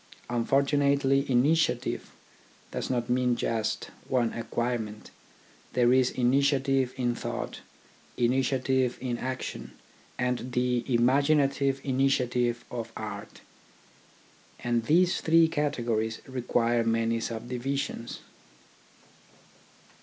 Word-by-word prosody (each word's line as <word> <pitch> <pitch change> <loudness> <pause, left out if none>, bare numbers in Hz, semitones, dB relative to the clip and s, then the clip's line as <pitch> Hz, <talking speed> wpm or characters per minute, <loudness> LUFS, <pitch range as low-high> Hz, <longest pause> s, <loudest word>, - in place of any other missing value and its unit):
Unfortunately 140 +2 +2
initiative 145 +6 +1 0.6
does - - -3
not 120 -2 -1
mean 125 0 +2
just 110 -2 -2 0.2
one 120 -3 +1
acquirement 115 -2 -3 0.3
— - - -29
there 125 0 +4
is 130 -1 +4
initiative 135 0 +2
in 120 -2 +1
thought, - - -5 0.6
initiative 130 +1 +1
in 120 -2 -3
action, 130 0 -5 0.4
and 125 0 -2
the 125 0 +1
imagina 135 +4 +4
tive 140 -1 0
initiative 125 -3 +1
of 115 -2 -5
art; - - -7 1.2
and 120 -1 0
these 175 +6 +3
three 165 0 +5
categories 120 -8 -1
require 120 -2 +1
many 115 0 +1
subdivisions. 120 +2 -4
125 Hz, 95 wpm, -28 LUFS, 120-135 Hz, 1.2 s, three